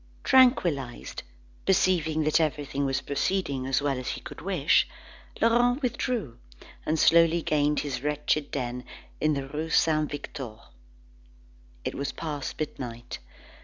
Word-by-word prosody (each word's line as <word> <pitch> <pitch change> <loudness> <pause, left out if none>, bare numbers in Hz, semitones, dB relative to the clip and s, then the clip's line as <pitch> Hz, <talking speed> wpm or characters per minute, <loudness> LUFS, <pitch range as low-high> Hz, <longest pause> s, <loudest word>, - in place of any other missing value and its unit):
Tranquillised, 175 - +3 0.4
perceiving 165 -5 +2
that 155 +2 +3
everything 145 -2 -1
was 135 0 0
proceeding 140 -3 -1
as 135 +1 +1
well 140 -3 0
as 130 - -6
he - - -3
could - - -9
wish, - - +3 0.5
Laurent 245 +4 +3
withdrew, 235 - -2 0.5
and 160 - +2
slowly 165 +1 +5
gained 150 0 +2
his 135 -4 -4
wretched 150 0 0
den 125 -2 -3 0.4
in 155 -1 +2
the 135 -1 -3
rue 155 +3 -3
Saint 155 -2 +3
Victor. 135 -5 -6 1.3
It - - -2
was 140 0 -3
past 150 -4 -5
midnight. 120 -6 -5
150 Hz, 130 wpm, -27 LUFS, 135-165 Hz, 1.3 s, slowly